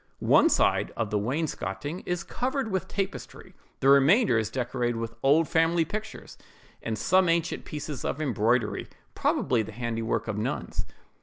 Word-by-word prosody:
One - - +4
side - - +2
of 115 -3 -2
the 105 - +1
wainscoting 140 - -3
is 175 -1 -1
covered 260 +1 -2
with 190 -1 -1
tapestry; 195 -1 -5 0.3
the 135 - +4
remainder 140 - +5
is 110 - -2
decorated 120 -1 -2
with 115 0 -4
old 150 +4 +4
family 165 0 +2
pictures, 215 +5 -7 0.4
and 110 -1 -3
some 185 - +3
ancient 170 0 0
pieces 150 -3 -6
of 140 - -2
embroidery, 115 -5 0 0.3
probably 120 -3 +1
the 110 0 -7
handiwork 115 -1 -2
of 105 -1 -2
nuns. - - -3
135 Hz, 150 wpm, -27 LUFS, 115-170 Hz, 0.4 s, remainder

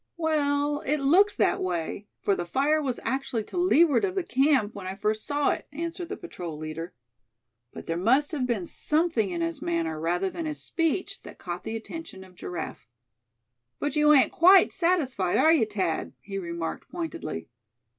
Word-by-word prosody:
"Well, 290 -2 +1
it 300 +2 +1
looks 360 +10 +4
that - - +2
way, 180 +3 -3 0.2
for 200 - +3
the 175 - -1
fire 290 - +2
was 260 -4 -2
actually 250 -2 -2
to 210 - -12
leeward 340 -2 +4
of 380 -2 0
the 380 - 0
camp 265 -7 +2
when 195 -2 -7
I 190 - -4
first 215 +2 -2
saw 290 0 +2
it," - - -4
answered 335 +3 -5
the - - -4
patrol 175 - -7
leader; 155 +3 -6 0.8
but - - -9
there 165 - -2
must 260 +10 +3
have 275 -5 -1
been 220 -7 -1
something 300 - 0
in 170 -2 -3
his 165 0 -2
manner 165 -2 -1
rather 175 +4 0
than 330 -2 -4
his 300 -2 -3
speech 330 +2 -1
that - - -12
caught 175 0 -6
the 225 - -4
attention 225 -4 -8
of 185 -1 -16
Giraffe. 175 -2 -6 0.9
"But 290 0 -2
you 300 0 +5
ain't 285 -3 +5
quite 375 +1 +6
satisfied, 270 - +1
are 320 - +6
you, 260 -9 +3
Thad?" 190 -6 -2
he 195 0 -6
remarked, 170 -2 -5
pointedly. 330 - -5
260 Hz, 180 wpm, -27 LUFS, -, 0.9 s, quite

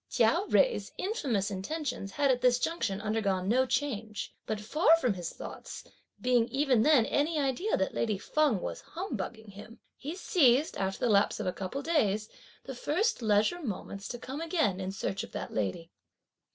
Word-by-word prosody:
Chia 315 - +3
Jui's - - +2
infamous 260 - -1
intentions 240 0 -4
had 280 -2 +3
at 250 -1 0
this 250 -1 +4
junction 250 - -1
undergone 205 -4 0
no 255 +5 +3
change; 225 -7 -2
but 215 - -2
far 305 +9 +4
from 250 -9 +1
his 175 -3 -5
thoughts - - -8 0.4
being 245 -2 +3
even 270 -4 +2
then 275 -3 +5
any 310 +6 +1
idea 285 - 0
that 190 - -1
lady 215 -3 0
Feng 275 -2 +1
was - - -5
humbugging 230 - -6
him, 215 +4 -12 0.2
he 300 +5 -6
seized, 300 - +3
after 195 0 -2
the 235 - +3
lapse 200 +1 +3
of 215 - -3
a 180 - -1
couple 195 +9 -4
of - - -14
days, 215 -10 +1 0.3
the 270 - -6
first 310 - 0
leisure 215 +10 +2
moments 200 - -5
to 240 - -5
come 265 +5 -6
again 320 - 0
in 190 0 -3
search 195 0 -3
of - - -11
that - - -5
lady. 110 - -2
240 Hz, 180 wpm, -30 LUFS, 200-295 Hz, 0.4 s, then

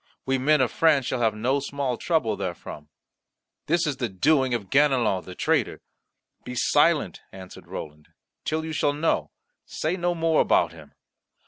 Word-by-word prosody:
We 135 0 0
men 150 +2 +3
of 125 - +1
France 150 -5 +3
shall 120 - -2
have 110 -2 +2
no 125 +6 0
small 140 -2 -3
trouble 125 -8 0
therefrom. 80 -5 -7 0.8
This 170 +2 +2
is 145 -3 -2
the 120 -3 -2
doing 130 +5 +2
of 100 -5 -6
Ganelon 130 -9 +2
the 90 - -9
traitor." - - 0 0.6
"Be 125 - -7
silent," 150 +5 +2
answered 95 -1 -12
Roland, 75 0 -8 0.4
"till 160 +1 -2
you 160 - -5
shall 145 -1 +1
know; 150 +3 0 0.3
say 160 +3 -3
no 175 -1 0
more 165 -1 +2
about - - +2
him." - - -15
135 Hz, 160 wpm, -25 LUFS, 110-155 Hz, 0.8 s, men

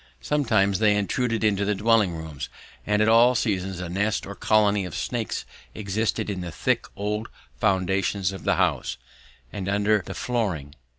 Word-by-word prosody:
Sometimes 110 -10 +2
they 105 -2 +4
intruded 115 +3 0
into 100 -2 +2
the 105 +1 +1
dwelling 105 -3 +3
rooms, 80 -4 -6 0.4
and 105 0 +3
at - - +2
all 120 +3 +6
seasons 95 -5 -1
a 90 - -4
nest 100 +5 -1
or 100 - -6
colony 105 -1 +2
of 90 -4 -6
snakes - - -3 0.3
existed 105 -2 -1
in 100 -3 -3
the 90 - -5
thick - - 0
old 105 +2 -3 0.3
foundations 95 -1 +1
of 95 - -8
the - - +2
house, - - 0 0.6
and 100 -1 -3
under 105 +1 +2
the - - -7
flooring. 95 - -2
100 Hz, 165 wpm, -25 LUFS, 95-110 Hz, 0.6 s, all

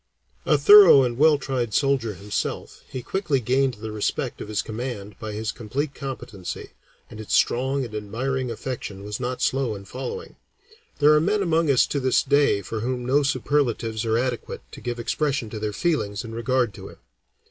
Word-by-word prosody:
A - - +5
thorough 410 - +9
and 120 -2 -1
well 150 +3 +5
tried 130 -6 -2
soldier 135 -7 +1
himself, 100 +3 -4
he 130 - -6
quickly 170 - 0
gained 130 +2 +1
the 110 +1 -7
respect 105 -1 -2
of - - -6
his 105 -1 -1
command 110 -3 -5
by 110 -2 -5
his 110 +1 -3
complete 135 +6 -4
competency, 125 -10 -7 0.4
and 110 - -10
its 110 - -1
strong 130 +2 +1
and 115 - -10
admiring 125 +5 -2
affection 115 -4 -6
was 105 0 -5
not 125 0 -3
slow 130 -5 0
in 100 0 -10
following. 460 - -7 0.6
There 150 +1 +6
are 150 - +4
men 200 +4 +1
among 165 -3 +1
us 135 -3 +5
to 140 - -2
this 130 -2 +2
day 140 -8 +3
for 110 +4 -4
whom 125 +2 -3
no 140 +4 +3
superlatives 125 -5 0
are 115 0 +1
adequate 125 -1 -3
to - - -11
give 120 0 -4
expression 120 0 -1
to 110 - -5
their 105 0 -2
feelings 105 - -1
in 115 -1 -8
regard 120 -1 0
to 95 0 -10
him. - - -14
125 Hz, 185 wpm, -24 LUFS, 110-140 Hz, 0.6 s, thorough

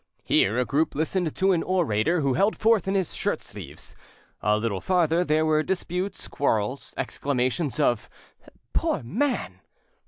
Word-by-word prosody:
Here, 105 +5 +3
a 125 - +2
group 150 +5 0
listened 160 +2 -1
to 190 +1 +3
an 170 -3 +2
orator 165 - +1
who 135 -2 +2
held 200 +8 +2
forth 220 -4 +3
in 195 - 0
his 190 -4 0
shirt - - -1
sleeves, - - -8 0.5
a 105 +2 +3
little 105 -3 -2
farther 175 -2 +2
there 155 -1 +2
were 155 -1 +3
disputes, 185 +2 -3
quarrels, 125 -2 -1
exclamations 135 +2 -1
of 120 -6 +1 0.6
"Poor - - 0
man!" 200 - -1
155 Hz, 150 wpm, -25 LUFS, 125-185 Hz, 0.6 s, Here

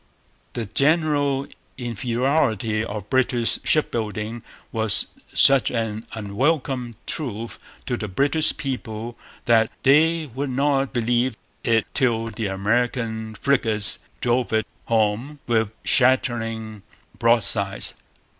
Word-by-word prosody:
The 115 - -3
general 145 +2 +1 0.3
inferiority 120 -2 0
of 105 -2 -6
British 125 -3 +2
shipbuilding 110 -5 0 0.3
was 110 -2 0 0.3
such 135 -2 +5
an 115 -2 -3
unwelcome 125 +3 -1
truth 115 -6 -3 0.3
to 125 - -2
the 110 - -4
British 140 - +2
people 120 -4 -5 0.3
that 115 -2 +4
they 160 +4 +4
would 135 +2 -3
not 135 +1 +1
believe 120 0 0 0.3
it 115 -1 +2
till 115 -4 0
the 110 -1 -3
American 110 +2 -1
frigates 110 -5 +1 0.2
drove 120 0 +1
it 110 0 +2 0.2
home 115 +6 0
with 110 -3 +1
shattering 115 -4 +1 0.4
broadsides. 110 -4 +3
120 Hz, 100 wpm, -23 LUFS, 110-135 Hz, 0.4 s, such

